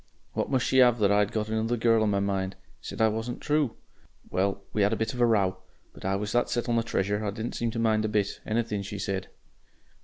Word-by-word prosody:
What - - -1
must 130 -2 +1
she 130 - +4
'ave 120 -2 +5
but 105 -3 +3
that - - +3
I'd 105 0 +3
got 105 -1 -1
another 110 +2 0
girl 115 -1 +3
on 110 - +2
my 100 -1 +1
mind! 95 -1 -1 0.3
Said - - -5
I - - +6
wasn't 115 +3 -3
True. 150 -4 +1 0.6
Well, 100 +1 0
we 105 - +1
had 100 +2 +3
a - - +2
bit 110 +3 -2
of 125 - -3
a 120 - +6
row. 100 -5 +2 0.4
But - - -12
I 95 +1 +1
was 105 +1 -3
that 120 - +2
set 120 - -1
on 120 - +1
the 115 - +3
Treasure, 105 -2 -1
I 105 - 0
didn't 110 +3 -4
seem 115 - -1
to 115 - -5
mind 110 -1 +2
a - - +1
bit 105 -2 -1
Anything 110 -2 -1
she 100 +1 -6
said. 95 -1 -3
110 Hz, 255 wpm, -27 LUFS, 100-115 Hz, 0.6 s, I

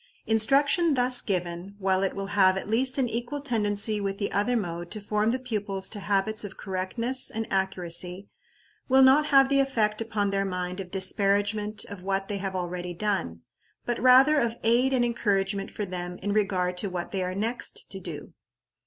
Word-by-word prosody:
Instruction 275 - +3
thus 250 0 +2
given, 180 0 -3
while 190 -1 +1
it 195 - -1
will 195 0 -4
have 190 -2 +4
at 190 - -5
least 255 +5 +2
an 260 -2 +2
equal 240 +5 -3
tendency 210 -5 0
with 195 0 -2
the 200 - -2
other 225 +5 +1
mode 175 -4 -4
to 215 - -5
form 210 +1 0
the 250 - +1
pupils 205 -6 -3
to 210 - -6
habits 205 +2 0
of 200 -2 -8
correctness 230 +7 -2
and 225 0 -3
accuracy, 185 0 -2 0.6
will 265 +1 +6
not 280 +3 +5
have 270 -2 +6
the 275 0 +2
effect 225 -6 +1
upon 210 -3 -1
their 195 0 +1
mind 180 -1 -4
of 185 -2 -6
disparagement 205 +2 +1
of 200 -2 -9
what 195 +1 -2
they 205 - -2
have 195 -1 -4
already 180 -1 -4
done, 180 - -2 0.4
but 240 -2 -2
rather 265 +4 +6
of 235 -2 -1
aid 240 +4 +3
and 250 -2 +2
encouragement 200 -4 -1
for 210 - -4
them 180 -1 -5
in 205 - -1
regard 185 -4 0
to 200 +2 -1
what 180 -1 -5
they 195 - -2
are 180 0 -3
next 225 +5 -3
to - - -6
do. - - -8
205 Hz, 190 wpm, -26 LUFS, 190-235 Hz, 0.6 s, will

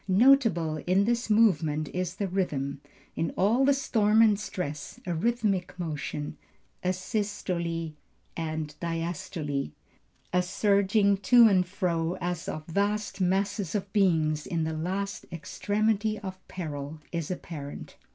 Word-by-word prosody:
Notable 195 - +4
in 190 +2 +4
this 235 +1 0
movement 160 -9 +3
is 180 0 -3
the 200 0 -2
rhythm. 145 -8 -2 0.3
In 165 - 0
all 225 +8 +3
the 280 - +5
storm 220 -5 +3
and 210 -3 +4
stress, 150 -9 -5
a 175 - -1
rhythmic 195 -1 0
motion, 150 -3 -4 0.4
a 180 - +2
systole 180 -4 -2 0.4
and 155 -2 -3
diastole, 165 - -3 0.6
a 180 - +4
surging 200 +2 +3
to 235 +3 +7
and 185 -4 +3
fro, 175 -3 -1
as 175 -1 -3
of 155 0 -5
vast 205 +4 -1
masses 195 +1 0
of 200 -1 -3
beings 160 -6 +2
in 165 -2 -1
the 160 0 -2
last 190 +5 -3
extremity 215 +5 0
of 190 -2 -8
peril, 150 -3 -5
is 170 -3 -3
apparent. 155 -5 -7
185 Hz, 130 wpm, -28 LUFS, 160-205 Hz, 0.6 s, to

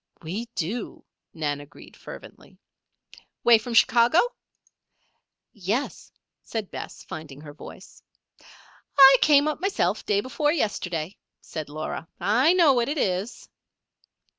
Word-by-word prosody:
"We 190 +9 -4
do," 205 +7 -4 0.3
Nan 145 -3 -3
agreed 145 +3 -15
fervently. - - -13 0.9
"'Way 235 -2 +6
from 230 +2 -6
Chicago?" 235 +6 +4 1.4
"Yes," 215 +5 -3 0.3
said 220 -4 -5
Bess, - - -8
finding 150 -3 -9
her 145 -1 -11
voice. 150 - -13 1.0
"I 270 -1 +9
came 290 -1 +5
up 305 - -3
myself 220 - 0
day 200 -1 +1
before 295 +5 0
yesterday," 185 - -3 0.2
said 155 -2 -7
Laura. 155 +2 -5
"I 255 - +3
know 335 -6 +5
what 240 0 0
it 300 - -2
is." 195 0 -2
215 Hz, 115 wpm, -25 LUFS, 165-270 Hz, 1.4 s, I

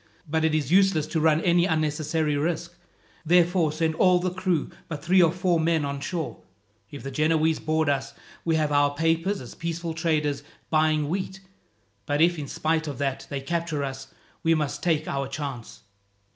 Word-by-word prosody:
But 160 +1 0
it 160 -1 +2
is 150 -2 -1
useless 190 -5 +4
to 160 - -2
run 155 0 +3
any 175 0 +3
unnecessary 155 -1 0
risk. 170 +3 -2 0.5
Therefore 175 -1 +3
send 160 +1 0
all 180 +2 +4
the 180 0 -1
crew 180 -4 -1 0.2
but 150 -4 -6
three 185 +2 +5
or 165 -2 +5
four 180 -1 +1
men 160 -2 +1
on 140 0 -3
shore. 160 +3 -4 0.5
If 145 - -9
the 135 - -5
Genoese 155 +2 +2
board 155 0 0
us, 140 -1 -1 0.3
we 165 -1 +1
have 155 -2 +1
our 145 0 +3
papers 165 +5 +1
as 125 - -9
peaceful 170 0 -4
traders 150 -3 0 0.3
buying 155 -1 +2
wheat; 190 +3 -3 0.7
but 145 0 0
if, 170 +1 +3
in 145 - -5
spite 160 +3 -1
of 140 -4 -5
that, 135 -1 -2
they 140 -1 -3
capture 165 -1 -2
us, 135 0 -6 0.3
we 165 -1 +3
must 150 -1 -2
take 155 -2 +1
our 140 -1 -2
chance." 135 -4 -6
160 Hz, 180 wpm, -25 LUFS, 145-170 Hz, 0.7 s, three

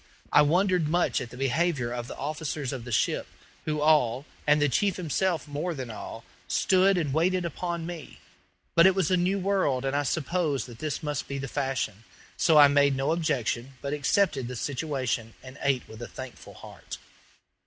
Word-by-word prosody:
I - - +8
wondered 180 +2 +2
much 175 +3 +1
at 125 - -6
the 125 - -11
behavior 135 -1 0
of 120 -1 -4
the - - -8
officers 145 -1 -3
of 125 -3 -6
the 120 - -7
ship, 110 - +1 0.4
who 150 -1 -1
all, 145 -4 +3 0.2
and 150 +1 +5
the 145 - +3
chief 190 +8 +1
himself 170 -2 -1
more 150 +4 -3
than 130 -4 -5
all, 110 - -8 0.2
stood 190 0 +3
and 150 -6 -1
waited 180 +3 +1
upon 170 +1 -3
me; 170 -2 -8 0.5
but 170 +2 +7
it 190 - +3
was 190 0 +1
a - - +5
new 180 +2 +1
world, 185 -10 +1
and 135 +1 -1
I 145 - +2
supposed 155 0 -1
that 120 -2 -12
this 155 -1 -3
must 150 -1 -3
be 140 - -4
the 135 0 -4
fashion; 130 -6 -2 0.3
so 165 -2 +4
I 145 -1 +10
made 140 -1 +3
no 135 +3 0
objections, 135 -6 -1
but 140 +2 -4
accepted 145 -2 +1
the 125 - -6
situation 130 -4 -2
and 130 +1 -11
ate 135 -2 0
with 110 +1 -11
a 120 - -5
thankful 130 -1 -10
heart. - - -10
145 Hz, 190 wpm, -27 LUFS, 130-170 Hz, 0.5 s, I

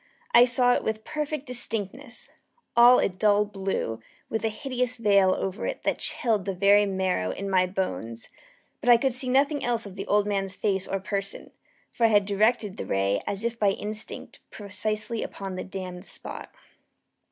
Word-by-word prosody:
I 240 +1 +8
saw 245 0 +3
it - - 0
with 220 0 -2
perfect 305 -1 -4
distinctness 240 0 -3 0.4
all 240 +1 +8
a - - +3
dull 205 +2 +2
blue, 195 - -3 0.3
with 220 - -2
a 225 - +1
hideous 250 +1 -2
veil 200 -4 +4
over 190 +2 -3
it - - -5
that - - 0
chilled 220 -6 0
the 195 -1 -2
very 200 +2 +5
marrow 190 - -1
in 195 - -4
my 185 -1 +3
bones; 120 -12 -4 0.5
but 245 - -1
I 240 - +9
could 265 +1 0
see 255 +1 +2
nothing 280 +3 +2
else 235 -2 0
of 195 -2 -9
the 195 - -6
old 205 0 +3
man's 195 -2 -1
face 195 -2 -1
or 195 - -2
person: 195 0 -4 0.4
for 235 - +1
I - - +5
had 205 -2 +4
directed 210 0 +1
the - - -5
ray 100 +1 +1
as 200 +3 -2
if 235 0 -2
by 200 -2 +3
instinct, 215 +2 -5
precisely 215 +2 -3
upon 195 -1 -6
the 185 - -4
damned 185 -1 -7
spot. - - -7
205 Hz, 180 wpm, -26 LUFS, 195-235 Hz, 0.5 s, I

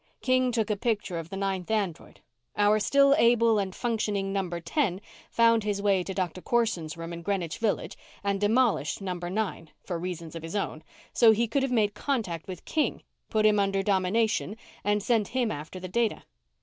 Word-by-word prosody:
King 255 -1 +2
took 225 -3 0
a - - +1
picture 205 -5 -1
of 165 0 -8
the 195 - -6
ninth 195 -1 -2
android. 200 -7 -2 0.4
Our 210 +1 +4
still 275 +5 +4
able 230 -2 +4
and 190 -2 -3
functioning 210 -5 -1
number 180 -3 -2
ten 190 - 0 0.3
found 230 -1 +4
his 205 -1 -1
way 200 -2 +2
to 190 +2 -5
Doctor 185 -1 -2
Corson's 180 -10 0
room 165 +1 -6
in 170 - -6
Greenwich 175 -3 -2
Village 220 -3 -1 0.3
and 200 0 -1
demolished 220 - +2
number 180 -3 -4
nine, 190 -5 -3
for 175 -3 -4
reasons 170 -2 -6
of 165 - -5
his 165 +5 -7
own, 180 -6 -2 0.3
so 230 -2 +6
he 230 +2 +1
could 275 +5 0
have 265 -1 -1
made 215 -4 +2
contact 210 - -2
with 185 -3 -8
King, 310 -2 -1 0.3
put 215 -1 +2
him 210 -1 +5
under 195 -1 +1
domination, 205 +2 +1 0.3
and 205 0 +1
sent 225 -3 +2
him 240 -4 +1
after 155 +5 -6
the 185 - -6
data." 230 +3 0
205 Hz, 190 wpm, -27 LUFS, 180-225 Hz, 0.4 s, so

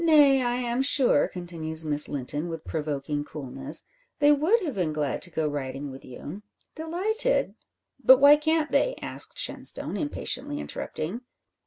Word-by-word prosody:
"Nay, 290 -5 +5
I 245 -1 0
am 245 0 -1
sure," 270 - +4
continues 165 -3 -5
Miss 150 -1 +3
Linton, 145 +4 -3
with 165 -1 -7
provoking 145 -2 -3
coolness, 135 -3 -3 0.3
"they 290 0 +5
would 315 +11 +3
have 315 -7 -3
been 175 -7 -1
glad 150 -3 -2
to 175 - -2
go 160 -2 -1
riding 140 -1 -5
with 130 - -11
you; 145 +9 -9 0.3
delighted 400 +10 0 0.3
" 275 - -36
"But 260 +3 +8
why 285 +1 +8
can't 315 0 0
they?" - - +2
asked - - -5
Shenstone, - - -2
impatiently 290 -1 -2
interrupting. 195 - -5
200 Hz, 155 wpm, -26 LUFS, -, 0.3 s, But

